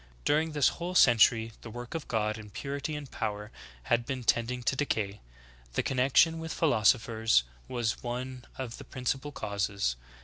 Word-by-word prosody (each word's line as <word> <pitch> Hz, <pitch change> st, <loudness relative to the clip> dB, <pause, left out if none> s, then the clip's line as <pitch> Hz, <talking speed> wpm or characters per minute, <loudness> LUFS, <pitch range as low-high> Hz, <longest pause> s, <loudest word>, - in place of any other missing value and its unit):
During 155 Hz, +1 st, +2 dB
this 145 Hz, -3 st, +4 dB
whole 175 Hz, +2 st, -5 dB
century 115 Hz, -4 st, +5 dB
the 115 Hz, -, -9 dB
work 120 Hz, +2 st, -7 dB
of 165 Hz, -2 st, -4 dB
God, 110 Hz, -1 st, -1 dB
in 105 Hz, -1 st, -10 dB
purity 140 Hz, +7 st, -4 dB
and 145 Hz, -3 st, -7 dB
power, 105 Hz, -1 st, -4 dB, 0.3 s
had 120 Hz, -, +2 dB
been 130 Hz, 0 st, -4 dB
tending 120 Hz, +2 st, +1 dB
to 130 Hz, -, +1 dB
decay. 105 Hz, -8 st, -1 dB, 0.5 s
The -, -, 0 dB
connection 135 Hz, +5 st, +3 dB
with 160 Hz, 0 st, -5 dB
philosophers 115 Hz, -, +3 dB, 0.2 s
was 120 Hz, -3 st, -1 dB
one 125 Hz, +1 st, -5 dB
of 125 Hz, -3 st, -5 dB
the -, -, -8 dB
principal 135 Hz, +2 st, -3 dB
causes. 100 Hz, -, -1 dB
120 Hz, 160 wpm, -30 LUFS, 110-140 Hz, 0.5 s, century